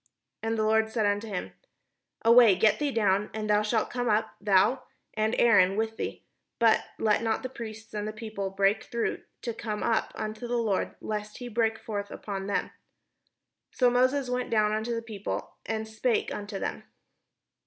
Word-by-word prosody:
" - - -58
And 225 0 -1
the 215 - +1
Lord 220 0 +3
said 220 -1 0
unto 205 +2 0
him: 180 - -4 0.7
"Away, 230 -3 +8
get 215 +3 +3
thee 295 -1 +1
down, 210 -4 +1
and 215 -1 -3
thou 210 0 +4
shalt 215 +1 0
come 245 -1 -1
up, 210 0 +1
thou, 205 +6 +3 0.3
and 220 +1 0
Aaron 200 -5 +5
with 220 +1 -1
thee, - - -5 0.3
but 230 -1 +4
let 215 -1 +2
not 225 +1 0
the 255 - -3
priests 220 -3 -9
and 210 0 -3
the - - -2
people 215 -3 -5
break 195 +2 +1
through 235 -1 -2 0.2
to 235 - -2
come 215 -2 -4
up 230 -1 +1
unto 215 +2 -5
the 240 0 0
Lord, 215 -5 0
lest 210 0 -4
he 245 - -7
break 225 -1 +1
forth 205 -3 -5
upon 195 -2 -5
them." 200 - -1 1.0
So 250 -2 +3
Moses 255 +2 +2
went 250 0 -2
down 215 -2 +3
unto 220 +2 -1
the 230 - -3
people, 210 -3 -5
and 220 0 -2
spake 220 +2 0
unto 205 -1 -5
them. - - -3
220 Hz, 185 wpm, -28 LUFS, 210-230 Hz, 1.0 s, Away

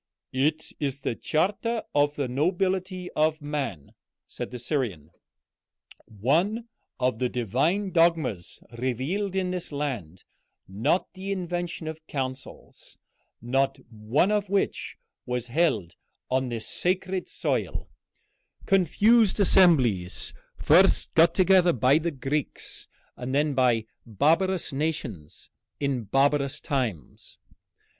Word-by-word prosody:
"It 150 +4 0
is 140 -1 -2
the - - -1
charter 210 - -1
of 145 0 +2
the 140 -3 -1
nobility 185 +6 -1
of 155 0 +1
man," 145 - -4 0.3
said - - -6
the 125 - -7
Syrian, 115 - -3 1.0
"one 170 - 0 0.3
of 125 -3 0
the 125 - +1
divine 140 - 0
dogmas 165 - +1 0.2
revealed 135 - -2
in 185 -1 0
this 180 -3 -5
land; 125 - -4 0.4
not 110 - 0
the 190 +1 -5
invention 175 -3 -3
of 160 0 -5
councils, 130 -1 -7 0.5
not 135 +3 +1
one 115 - +1
of 205 -2 0
which 200 0 -1 0.3
was 125 -1 -2
held 110 - +1 0.4
on 130 0 +1
this 115 -2 -4
sacred 185 +1 -1
soil, - - -2 0.8
confused 205 +4 +4
assemblies 135 - +3 0.2
first - - +4
got 165 +1 +5
together 185 -2 +5
by 130 +5 +4
the 170 +1 -1
Greeks, 140 0 -4 0.3
and 130 +2 -4
then 150 0 +2
by 125 -4 +2 0.2
barbarous 165 - +1
nations 135 - -4 0.3
in 135 -5 -1
barbarous 140 +4 +1
times." 120 - -4
145 Hz, 110 wpm, -26 LUFS, 125-180 Hz, 1.0 s, got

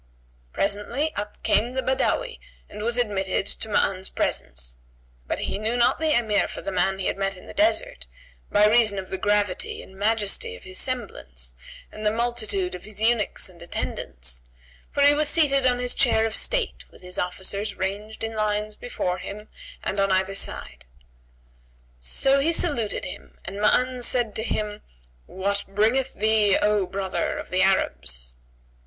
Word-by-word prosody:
Presently 210 - 0
up 210 0 -6
came 240 +3 +2
the 260 0 -1
Badawi 465 - 0 0.3
and 210 - -8
was 235 +2 0
admitted 195 -5 0
to 220 - -3
Ma'an's 190 -2 +1
presence; - - -1 0.5
but - - -1
knew 220 +4 -1
not 240 - +4
the 315 -3 +3
Emir 215 -4 +2
for - - -7
the 195 - -3
man 190 +1 +1
he 190 - -4
had - - -1
met 195 -1 -1
in - - -13
the - - -9
desert, 340 +11 +1 0.4
by 205 0 +5
reason 215 -2 +4
of 190 -1 -5
the 190 - -2
gravity 205 -2 0
and 190 - -15
majesty 205 - 0
of 90 - -14
his 185 0 -5
semblance - - -3 0.4
and 215 - -8
the 210 - +4
multitude 220 -5 0
of 180 - -7
his 210 -1 -7
eunuchs 225 0 +2
and 175 -2 -14
attendants, 60 - -3 0.5
for 285 - +1
he 285 +1 +8
was 300 0 +2
seated 275 -5 +4
on 250 -1 +3
his 250 0 -1
chair 220 - +3
of 225 - -2
state - - 0
with - - -18
his 180 0 -3
officers 190 +3 -2
ranged 205 +4 -4
in 225 0 -2
lines 210 0 -1
before 180 -7 -2
him 205 +3 -8 0.3
and 200 - -1
on 195 0 +3
either 190 +1 +2
side. 65 - -3 1.1
So 270 - +3
he 305 +4 +3
saluted 285 -11 0
him 180 - -9
and 195 +3 -5
Ma'an 250 +4 +3
said 240 -3 +1
to - - -2
him 210 -2 -2 0.5
"What 200 +2 -1
bringeth 225 +7 +1
thee, 215 -2 +4
O 210 -2 +2
brother 190 0 -2
of - - -7
the 185 0 +2
Arabs?" 60 - +1
210 Hz, 170 wpm, -25 LUFS, 190-240 Hz, 1.1 s, he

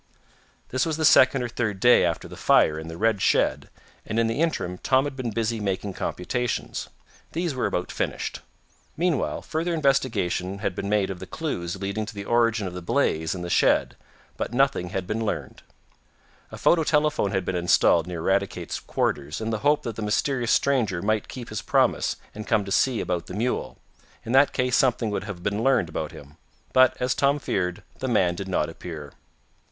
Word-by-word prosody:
This 130 0 0
was 160 -2 -1
the 160 - +1
second 130 -2 +6
or - - -1
third 115 -4 -2
day 120 +4 +6
after 85 -2 -1
the - - -10
fire 75 0 +3
in 80 - -8
the 80 0 -7
red 110 -1 +1
shed, - - +2 0.3
and 110 - -4
in 115 - +3
the 115 +6 -1
interim 90 - -1
Tom 130 0 +3
had 145 -1 -4
been 130 -3 -3
busy 115 0 -1
making 100 -1 -2
computations. 120 +8 -3 0.4
These 170 -2 -1
were 130 - 0
about 90 - -2
finished. - - -3 0.6
Meanwhile 170 -2 0
further 165 +2 -2
investigation 115 - 0
had 100 -2 -2
been 100 - -4
made 105 -2 +1
of 90 - -8
clues 90 - -3
leading 100 +2 -3
to 105 - -8
the 100 0 -6
origin 115 -2 +2
of 90 - -5
the 90 - -6
blaze 80 0 0
in 90 - -5
the - - -4
shed, - - +3 0.4
but 120 - -3
nothing 135 -9 +2
had 95 0 -3
been 110 +4 -2
learned. 110 - -4 0.9
A - - -8
photo 165 -2 +3
telephone 150 -8 +2
had 95 -2 -1
been 95 - -2
installed 85 -1 +3
near 85 -2 -5
Eradicate's 95 -2 -1
quarters, 70 +2 -2
in 110 0 -3
the 110 - -1
hope 145 +3 +2
that 115 -4 -5
the - - -4
mysterious 120 +3 0
stranger 110 -11 +1
might 110 0 0
keep 125 -2 -8
his 110 -1 -4
promise, - - +2 0.2
and 105 0 -8
come 105 - +2
to 100 - -7
see 125 +3 +2
about 90 -2 -2
the 90 - -7
mule. 120 +4 -2 0.5
In 115 - -4
that 135 +2 +5
case 125 -1 +1
something 120 -4 +2
would 105 - -3
have 95 -4 -7
been 100 +3 -1
learned 130 -11 +3
about 75 0 -4
him. 70 +1 -13 0.4
But, 130 -1 +5
as 125 0 +1
Tom 140 +1 +2
feared, 90 -9 -2 0.2
the 130 - -2
man 95 -8 +2
did 95 +2 -6
not 90 -5 0
appear. 80 -3 -8
110 Hz, 195 wpm, -25 LUFS, 90-130 Hz, 0.9 s, second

